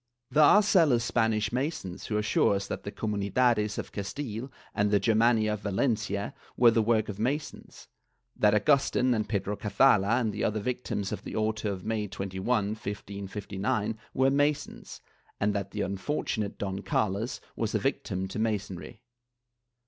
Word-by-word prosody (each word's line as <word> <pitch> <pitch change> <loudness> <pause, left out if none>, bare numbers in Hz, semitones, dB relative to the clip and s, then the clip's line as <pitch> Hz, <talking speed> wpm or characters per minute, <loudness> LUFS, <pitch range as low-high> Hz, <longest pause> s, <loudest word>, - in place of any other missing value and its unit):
^ - - -16
There 155 - +6
are 205 +8 +7
zealous 160 - +4
Spanish 110 -2 +1
Masons 125 - -3
who 105 - -1
assure 105 -1 +2
us 100 0 -2
that - - -5
the 100 - -4
Comunidades 105 +1 +1
of - - -5
Castile 115 +4 -5 0.2
and 105 0 +1
the 100 0 +3
Germania 110 +1 +3
of 105 - -4
Valencia 105 -1 -1 0.2
were 120 -1 +7
the 115 - +3
work 110 -1 +2
of 105 -1 -6
Masons; 140 +7 -4 0.5
that 105 0 +4
Agustin 130 +1 +3
and 110 -2 -1
Pedro 100 -1 -1
Cazalla 105 0 +3
and 110 -4 -1
the 105 - -3
other 110 +1 0
victims 105 -3 -3
of - - -5
the - - -7
auto 110 -1 0
of 95 -2 -6
May 110 -1 -1
21, 95 -1 -5 0.2
1559 105 +1 -3 0.2
were 135 +1 +3
Masons, 145 +1 -1 0.4
and 105 0 +1
that 100 -1 -2
the 105 - -4
unfortunate 100 +1 -2
Don 95 -1 -3
Carlos 105 +4 -1 0.2
was - - -2
a - - +5
victim 95 +1 -2
to 100 - -5
Masonry. 105 0 -3
105 Hz, 160 wpm, -28 LUFS, 100-120 Hz, 0.5 s, are